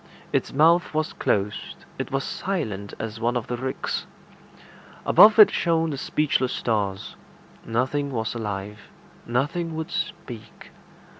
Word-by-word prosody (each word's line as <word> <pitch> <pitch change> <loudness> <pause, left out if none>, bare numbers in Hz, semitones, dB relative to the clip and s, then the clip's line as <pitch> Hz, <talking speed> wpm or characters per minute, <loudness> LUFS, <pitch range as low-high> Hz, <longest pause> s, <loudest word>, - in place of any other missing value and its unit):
Its - - 0
mouth 165 +4 +4
was 155 0 0
closed. 100 0 -2
It - - -3
was 135 0 -1
silent 110 - -3
as 110 0 -5
one 120 +2 +1
of 120 - -3
the 120 - -3
ricks. 130 +2 -3 1.0
Above 215 +1 +7
it 215 - +9
shone 165 -2 +1
the 140 - -4
speechless 135 -4 0
stars. 100 -4 -2 0.5
Nothing 130 +5 0
was 110 -3 -2
alive. 105 -2 -5 0.4
Nothing 160 +7 -1
would 160 +2 -4
speak. 120 -9 -6
130 Hz, 130 wpm, -24 LUFS, 110-160 Hz, 1.0 s, it